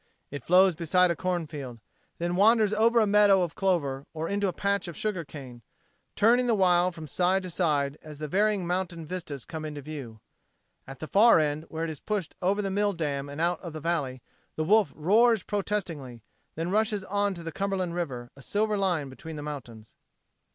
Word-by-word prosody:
It 145 - -6
flows 185 +1 +5
beside 175 +2 +2
a - - -1
cornfield, 155 -9 -4 0.4
then 175 +1 -2
wanders 215 +1 +4
over 230 +2 +3
to 230 - +6
a - - +2
meadow 205 -2 +5
of 170 -2 -3
clover 145 -8 -1
or 160 +1 -3
into 200 +1 0
a - - 0
patch 200 +2 -1
of 170 - -8
sugar 205 -6 -2
cane, 130 -5 -10 0.5
turning 245 +4 +4
the 230 - +3
while 180 -2 +3
from 160 -2 -9
side 185 +6 +1
to 185 - -6
side 150 -5 0
as 155 -1 -11
the 155 +1 -5
varying 205 +2 +1
mountain 175 -2 -2
vistas 155 -6 -6
come 160 -2 -6
into 150 -1 -5
view. 135 -7 -8 0.7
At 135 0 -9
the 155 - -4
far 225 +7 +6
end 155 0 0
where 160 0 -4
it 165 - -2
is 150 - -8
pushed 205 -6 -3
over 200 +3 +1
the 195 - -2
mill 205 +1 +1
dam 145 -4 -3
and 145 +2 -7
out 170 +2 0
of 170 -4 -7
the 155 - -5
valley, 145 -6 -2 0.3
the 155 - -1
Wolf 210 +5 +4
roars 220 +6 +3
protestingly; 170 - -4 0.3
then 165 +3 -3
rushes 210 -1 +1
on 200 0 -1
to 170 - -9
the 165 - -5
Cumberland 195 -1 -2
River 130 -9 -4
a 135 - -14
silver 210 +7 0
line 175 -7 0
between 155 +4 -9
the 150 - -6
mountains. 120 -7 -8
175 Hz, 200 wpm, -27 LUFS, 150-200 Hz, 0.7 s, to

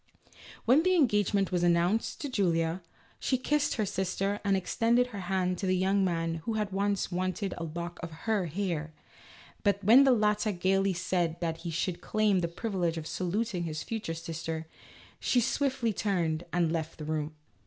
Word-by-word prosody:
When 255 +7 +6
the 370 +2 +3
engagement 205 - +2
was 180 -1 +1
announced 175 +5 +1
to 290 - -3
Julia, 170 -6 +1 0.4
she 260 - +1
kissed 295 +3 +1
her 215 - 0
sister, 195 +2 -1
and 200 -1 +2
extended 230 +6 +2
her 200 - -4
hand 185 -1 -1
to 195 - -2
the 185 0 +2
young 195 +2 +2
man 165 -2 -1
who 225 - -2
had 210 -2 -1
once 200 0 0
wanted 185 +2 -2
a 170 - -5
lock 170 +2 -6
of 170 - -5 0.2
her 215 -5 +1
hair, 165 -3 -3 0.7
but 200 -1 +1
when 235 +7 +8
the 270 - +5
latter 210 -2 +2
gaily 195 +2 +2
said 175 -2 -1
that 165 -2 -2
he 170 +1 -6
should 170 +2 -2
claim 215 -3 +2
the 170 - 0
privilege 175 -2 -2
of 160 - -5
saluting 185 +2 -2
his 155 -2 -4
future 215 -6 -4
sister, 165 -1 -5 0.5
she 250 - +2
swiftly 255 -2 0
turned 175 -5 -1
and 170 -2 +1
left 165 -1 -3
the 155 - -7
room. 155 0 -2
185 Hz, 175 wpm, -30 LUFS, 170-210 Hz, 0.7 s, when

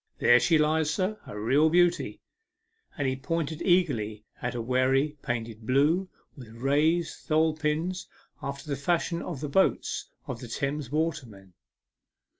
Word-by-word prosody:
" - - -45
There 120 0 +6
she 165 +4 +3
lies, 155 0 +2
sir 195 +5 -1
a 105 - -7
real 135 +9 +3
beauty," 175 +1 +2 0.7
and 145 -3 0
he 130 - 0
pointed 160 +2 -3
eagerly 115 - +1 0.2
at 120 0 -3
a - - -2
wherry 130 +5 +1
painted 115 -2 -4
blue, 155 +8 +2 0.3
with 125 -5 -11
raised 150 +7 +1
tholepins, 160 +3 0 0.3
after 140 +2 -6
the 140 - -1
fashion 170 +4 0
of 155 -7 -6
the 150 - -2
boats 190 +7 +1 0.2
of 120 - -5
the 125 - -8
Thames 140 +3 -3
watermen. 125 - -3
145 Hz, 145 wpm, -28 LUFS, 125-165 Hz, 0.7 s, There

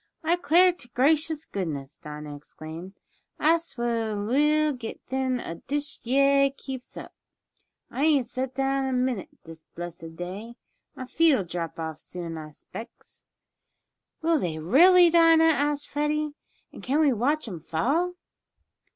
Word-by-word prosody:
"I 330 +2 +3
'clar 355 +1 +5
t' 275 -9 -11
gracious 310 +3 +2
goodness!" 150 -7 -5
Dinah 150 -1 -8
exclaimed, 160 +5 -10 0.4
"I 325 +2 +4
suah 235 -8 -2
will 300 +7 +2
get 240 -4 -7
thin 260 -1 -1
ef 165 -7 -6
dish 290 +1 -2
yeah 275 +3 +4
keeps 260 -2 -8
up! - - -9 0.8
I 280 - 0
ain't 290 -5 +3
set 255 +2 -4
down 270 0 0
a 265 - -1
minute 250 -6 -1
dis 160 -1 -12
blessed 170 -1 -8
day. 195 +7 -7 0.4
My 255 - -6
feet'll 300 - +3
drop 170 -1 -5
off 160 -1 -5
soon 170 -2 -7
I 155 -1 -7
'specs." 225 +9 -12 1.0
"Will 330 -1 +3
they, 165 -8 -2
really, 340 - +6
Dinah?" 330 -1 +6
asked 295 -2 +2
Freddie. 300 0 -1 0.4
"And - - -10
can 275 +4 0
we 295 -4 +4
watch 275 +6 0
'em 180 -6 -6
fall?" 280 - 0
260 Hz, 140 wpm, -26 LUFS, -, 1.0 s, really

